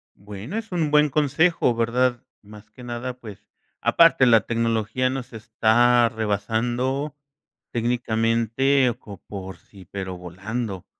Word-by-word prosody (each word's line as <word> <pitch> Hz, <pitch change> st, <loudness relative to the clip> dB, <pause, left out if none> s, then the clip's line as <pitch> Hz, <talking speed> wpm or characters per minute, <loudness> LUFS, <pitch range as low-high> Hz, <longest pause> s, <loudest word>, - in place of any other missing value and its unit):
Bueno, 105 Hz, -, -8 dB
es 225 Hz, -2 st, -6 dB
un 165 Hz, -4 st, -1 dB
buen 150 Hz, 0 st, +4 dB
consejo, 150 Hz, 0 st, +2 dB
¿verdad? 120 Hz, +1 st, +1 dB, 0.2 s
Más 105 Hz, +1 st, -14 dB
que 125 Hz, -, -14 dB
nada, 120 Hz, +1 st, -5 dB
pues, 105 Hz, -3 st, -12 dB, 0.3 s
aparte, 165 Hz, -5 st, +5 dB
la 115 Hz, -2 st, +6 dB
tecnología 115 Hz, +2 st, -1 dB
nos 130 Hz, -2 st, -6 dB
está 115 Hz, +2 st, +3 dB
rebasando 120 Hz, +6 st, -2 dB, 0.6 s
técnicamente 120 Hz, +2 st, +1 dB
co 100 Hz, -2 st, -11 dB
por 95 Hz, -2 st, -7 dB
sí, 95 Hz, -3 st, -17 dB
pero 95 Hz, -2 st, -5 dB
volando. 95 Hz, +3 st, -5 dB
120 Hz, 120 wpm, -23 LUFS, 110-130 Hz, 0.6 s, la